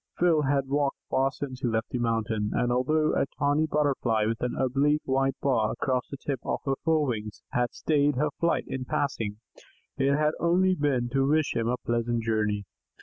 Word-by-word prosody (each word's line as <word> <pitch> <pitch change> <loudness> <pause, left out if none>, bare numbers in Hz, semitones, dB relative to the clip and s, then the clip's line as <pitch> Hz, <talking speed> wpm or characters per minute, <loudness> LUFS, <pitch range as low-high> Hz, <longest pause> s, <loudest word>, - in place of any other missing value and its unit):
Phil 170 -3 +3
had 140 -1 +1
walked 140 0 0
far 135 +1 +3
since 130 -2 -6
he 130 - -1
left 110 -1 -1
the 125 - -2
mountain, 115 -2 0
and 120 - +1
although 155 +5 +2
a - - +1
tawny 145 +2 +2
Butterfly 135 -8 +1
with 115 +1 -2
an 125 - -1
oblique 140 +4 +1
white 135 0 +1
bar 115 -6 +2
across 130 -2 -1
the 140 - -6
tip 135 0 -3
of - - -2
her 135 - +1
forewings 125 -10 -1
had 120 -1 0
stayed 145 -2 +1
her 150 +4 +1
flight 170 0 +1
in 130 - -4
passing, 115 -8 -2 0.6
it 135 +1 +3
had 150 0 +2
only 185 +2 +3
been 140 -7 0
to 135 +1 +1
wish 155 -1 +1
him 115 -1 0
a 125 +1 0
pleasant 120 -1 -1
journey. 105 -2 0
135 Hz, 190 wpm, -27 LUFS, 120-145 Hz, 0.6 s, Phil